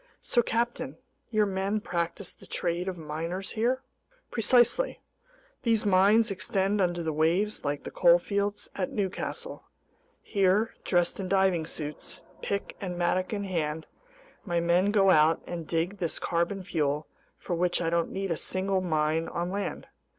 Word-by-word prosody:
"So, 240 Hz, -, +2 dB
captain, 230 Hz, -, -2 dB, 0.3 s
your 215 Hz, -2 st, +3 dB
men 195 Hz, +2 st, -1 dB
practice 175 Hz, 0 st, -3 dB
the -, -, -16 dB
trade 175 Hz, +2 st, -2 dB
of 185 Hz, -1 st, -3 dB
miners 165 Hz, +4 st, -4 dB
here?" 245 Hz, +4 st, 0 dB, 0.5 s
"Precisely. 245 Hz, -, +3 dB, 0.6 s
These 225 Hz, -2 st, +1 dB
mines 205 Hz, +3 st, +5 dB
extend 195 Hz, 0 st, 0 dB
under 175 Hz, -2 st, 0 dB
the 160 Hz, -1 st, -1 dB
waves 175 Hz, +8 st, +1 dB
like 145 Hz, 0 st, -2 dB
the -, -, -6 dB
coalfields 200 Hz, +4 st, +2 dB
at -, -, -2 dB
Newcastle. 250 Hz, -, -3 dB, 0.6 s
Here, 200 Hz, +2 st, +2 dB
dressed 175 Hz, 0 st, +1 dB
in 190 Hz, -, -3 dB
diving 190 Hz, -4 st, +2 dB
suits, 150 Hz, -2 st, -6 dB, 0.2 s
pick 200 Hz, 0 st, -3 dB
and 180 Hz, -3 st, -4 dB
mattock 180 Hz, +1 st, +1 dB
in 205 Hz, -2 st, -2 dB
hand, 160 Hz, -4 st, -2 dB, 0.6 s
my 175 Hz, -3 st, 0 dB
men 175 Hz, +3 st, +3 dB
go 195 Hz, -2 st, +5 dB
out 155 Hz, 0 st, +5 dB
and 170 Hz, -3 st, -5 dB
dig 175 Hz, +4 st, -1 dB
this 170 Hz, -4 st, -2 dB
carbon 175 Hz, +3 st, -1 dB
fuel 150 Hz, -4 st, -1 dB, 0.3 s
for 180 Hz, -, -4 dB
which 175 Hz, +1 st, +1 dB
I 165 Hz, -1 st, 0 dB
don't 170 Hz, -1 st, +1 dB
need 195 Hz, -1 st, -3 dB
a -, -, +2 dB
single 190 Hz, +2 st, 0 dB
mine 160 Hz, -1 st, +1 dB
on 175 Hz, +1 st, -3 dB
land. 200 Hz, +1 st, -3 dB
185 Hz, 150 wpm, -28 LUFS, 170-205 Hz, 0.6 s, mines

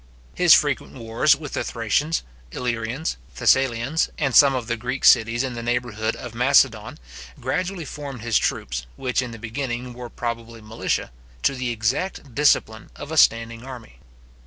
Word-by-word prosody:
His -, -, +7 dB
frequent -, -, 0 dB
wars 115 Hz, +5 st, +2 dB
with 145 Hz, 0 st, -9 dB
the -, -, -1 dB
Thracians, 125 Hz, +8 st, -1 dB, 0.3 s
Illyrians, 120 Hz, -, -3 dB, 0.2 s
Thessalians, 130 Hz, +3 st, +2 dB
and 135 Hz, -4 st, 0 dB
some 140 Hz, -2 st, +7 dB
of 125 Hz, -3 st, -3 dB
the 120 Hz, 0 st, -1 dB
Greek 125 Hz, +3 st, -3 dB
cities 120 Hz, +1 st, +5 dB
in 130 Hz, -2 st, -3 dB
the 120 Hz, -, -5 dB
neighbourhood 115 Hz, -2 st, -2 dB
of 120 Hz, -, -8 dB
Macedon, 120 Hz, -3 st, +2 dB, 0.4 s
gradually 180 Hz, -2 st, -2 dB
formed 140 Hz, -5 st, -7 dB
his 115 Hz, -2 st, +2 dB
troops, -, -, -2 dB
which 130 Hz, -1 st, -1 dB
in 125 Hz, -, -5 dB
the 115 Hz, -, -9 dB
beginning 120 Hz, +2 st, -4 dB
were 120 Hz, 0 st, -8 dB
probably 115 Hz, -1 st, -5 dB
militia, 110 Hz, -, -3 dB, 0.3 s
to -, -, +3 dB
the 130 Hz, -2 st, -3 dB
exact 125 Hz, -, -2 dB
discipline 115 Hz, -5 st, +2 dB
of 145 Hz, -, -9 dB
a -, -, -2 dB
standing 115 Hz, -4 st, +3 dB
army. 125 Hz, -4 st, -11 dB
120 Hz, 160 wpm, -23 LUFS, 115-135 Hz, 0.4 s, His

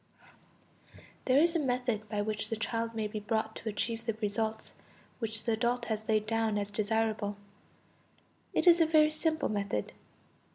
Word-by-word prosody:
There 260 Hz, +1 st, +4 dB
is 335 Hz, +2 st, +3 dB
a -, -, +3 dB
method 245 Hz, -6 st, -1 dB
by 210 Hz, -1 st, -1 dB
which 215 Hz, -1 st, -3 dB
the 225 Hz, -, -1 dB
child 230 Hz, +1 st, -2 dB
may 220 Hz, -1 st, -1 dB
be 210 Hz, 0 st, -4 dB
brought 220 Hz, +1 st, -1 dB
to 225 Hz, -, -4 dB
achieve 225 Hz, +2 st, -2 dB
the 225 Hz, -, +1 dB
results 220 Hz, +1 st, -2 dB, 0.5 s
which 225 Hz, -2 st, -3 dB
the 230 Hz, -, 0 dB
adult 235 Hz, +2 st, 0 dB
has 220 Hz, -1 st, -3 dB
laid 215 Hz, -1 st, +3 dB
down 225 Hz, -1 st, +1 dB
as 205 Hz, 0 st, -2 dB
desirable; 215 Hz, -1 st, 0 dB, 1.1 s
it -, -, +1 dB
is 345 Hz, -1 st, +7 dB
a 325 Hz, -, +5 dB
very 310 Hz, -1 st, +5 dB
simple 315 Hz, 0 st, 0 dB
method. 200 Hz, -, -2 dB
220 Hz, 165 wpm, -31 LUFS, 215-240 Hz, 1.1 s, is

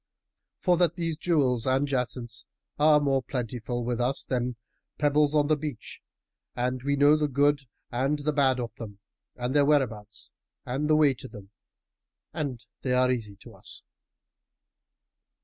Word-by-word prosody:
for 180 Hz, -2 st, +3 dB
that 175 Hz, -2 st, +2 dB
these 165 Hz, -3 st, -2 dB
jewels 135 Hz, -7 st, +1 dB
and 135 Hz, +2 st, +2 dB
jacinths 125 Hz, -3 st, -2 dB, 0.3 s
are 150 Hz, 0 st, +6 dB
more 135 Hz, -2 st, +1 dB
plentiful 120 Hz, -1 st, -4 dB
with 120 Hz, 0 st, -1 dB
us 130 Hz, +3 st, 0 dB
than 125 Hz, -1 st, -1 dB, 0.4 s
pebbles 150 Hz, 0 st, +2 dB
on 150 Hz, -1 st, +4 dB
the 155 Hz, +1 st, +3 dB
beach 145 Hz, -7 st, -7 dB, 0.5 s
and 125 Hz, +1 st, -1 dB
we 140 Hz, +2 st, 0 dB
know 145 Hz, +2 st, +6 dB
the 150 Hz, -1 st, +1 dB
good 145 Hz, +1 st, +3 dB, 0.3 s
and 135 Hz, +5 st, 0 dB
the 150 Hz, -, +1 dB
bad 135 Hz, -3 st, +3 dB
of 120 Hz, -3 st, -4 dB
them 105 Hz, -4 st, -8 dB, 0.4 s
and 125 Hz, +1 st, -3 dB
their 145 Hz, -, +6 dB
whereabouts 115 Hz, -8 st, 0 dB, 0.3 s
and 135 Hz, +5 st, -2 dB
the 155 Hz, -, +5 dB
way 150 Hz, -3 st, +5 dB
to 130 Hz, -, -10 dB
them, 105 Hz, -5 st, -12 dB, 0.8 s
and 135 Hz, -8 st, -4 dB, 0.2 s
they 125 Hz, -, 0 dB
are 125 Hz, 0 st, +3 dB
easy 110 Hz, -5 st, -3 dB
to -, -, -14 dB
us." -, -, -7 dB
130 Hz, 155 wpm, -27 LUFS, 120-150 Hz, 0.8 s, are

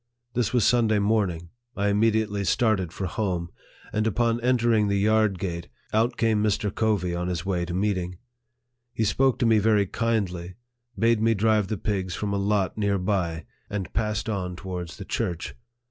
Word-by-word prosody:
This 120 Hz, -3 st, 0 dB
was 120 Hz, -5 st, +3 dB
Sunday 115 Hz, -3 st, +3 dB
morning. 100 Hz, -5 st, 0 dB, 0.3 s
I 100 Hz, 0 st, +1 dB
immediately 105 Hz, -1 st, +1 dB
started 100 Hz, -5 st, +1 dB
for 95 Hz, -, -4 dB
home; 90 Hz, -2 st, -2 dB, 0.4 s
and 110 Hz, +1 st, +1 dB
upon 115 Hz, +1 st, +1 dB
entering 120 Hz, -3 st, +3 dB
the 100 Hz, 0 st, +1 dB
yard 110 Hz, -1 st, +3 dB
gate, 85 Hz, -2 st, -4 dB, 0.3 s
out 115 Hz, +3 st, +2 dB
came 110 Hz, -2 st, +2 dB
Mr. 105 Hz, -1 st, 0 dB
Covey 105 Hz, -6 st, 0 dB
on 90 Hz, +1 st, -2 dB
his 90 Hz, -1 st, -3 dB
way 90 Hz, -3 st, 0 dB
to 85 Hz, -, -5 dB
meeting. 90 Hz, -2 st, -1 dB, 0.8 s
He 110 Hz, -, +1 dB
spoke 130 Hz, +4 st, +2 dB
to -, -, +1 dB
me 110 Hz, -2 st, +5 dB
very 105 Hz, -1 st, +3 dB
kindly, 95 Hz, -5 st, -2 dB, 0.4 s
bade 115 Hz, -1 st, +3 dB
me 115 Hz, 0 st, +3 dB
drive 105 Hz, -1 st, +2 dB
the 110 Hz, -, -2 dB
pigs 95 Hz, -2 st, -2 dB
from 105 Hz, -1 st, -2 dB
a -, -, +1 dB
lot 100 Hz, 0 st, 0 dB
near 100 Hz, -1 st, +1 dB
by, 90 Hz, -4 st, -1 dB, 0.2 s
and 100 Hz, -5 st, -4 dB
passed 105 Hz, -1 st, -1 dB
on 95 Hz, -4 st, -2 dB
towards 90 Hz, -3 st, -6 dB
the -, -, -7 dB
church. 85 Hz, -1 st, -3 dB
105 Hz, 175 wpm, -25 LUFS, 90-110 Hz, 0.8 s, me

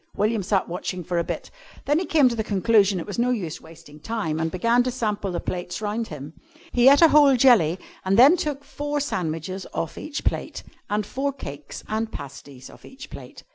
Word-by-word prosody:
William 215 Hz, +1 st, +1 dB
sat 190 Hz, 0 st, 0 dB
watching 180 Hz, +1 st, -4 dB
for 175 Hz, +1 st, -1 dB
a -, -, +1 dB
bit. -, -, -6 dB, 0.3 s
Then 295 Hz, +3 st, +2 dB
he 365 Hz, -, -2 dB
came 295 Hz, -5 st, +4 dB
to 245 Hz, -, 0 dB
the 220 Hz, -, -1 dB
conclusion 205 Hz, -1 st, +3 dB
that 170 Hz, -, -3 dB
it -, -, -15 dB
was 205 Hz, +2 st, -5 dB
no 245 Hz, +1 st, +2 dB
use 185 Hz, -11 st, -3 dB
wasting 160 Hz, -2 st, -15 dB
time, 160 Hz, -4 st, -3 dB
and 160 Hz, 0 st, 0 dB
began 230 Hz, +8 st, +2 dB
to 250 Hz, -, 0 dB
sample 210 Hz, -5 st, -2 dB
the 175 Hz, -, -3 dB
plates 180 Hz, -1 st, -4 dB
around 215 Hz, +2 st, -3 dB
him. 150 Hz, 0 st, -9 dB, 0.4 s
He 245 Hz, +2 st, +6 dB
ate 285 Hz, +4 st, +6 dB
a 330 Hz, -, +8 dB
whole 290 Hz, -3 st, +6 dB
jelly, 215 Hz, -, +5 dB, 0.3 s
and 190 Hz, +1 st, +1 dB
then 275 Hz, +8 st, +8 dB
took 300 Hz, -5 st, -3 dB
four 290 Hz, +1 st, -3 dB
sandwiches 185 Hz, -, -3 dB
off 165 Hz, -, -3 dB
each 300 Hz, -1 st, -5 dB
plate, -, -, -3 dB, 0.3 s
and 210 Hz, 0 st, -1 dB
four 275 Hz, +6 st, -2 dB
cakes 145 Hz, -, -9 dB
and 220 Hz, +1 st, -2 dB
pasties 140 Hz, -1 st, -10 dB
off -, -, -16 dB
each 265 Hz, -, -12 dB
plate. -, -, -11 dB
210 Hz, 215 wpm, -24 LUFS, 170-255 Hz, 0.4 s, a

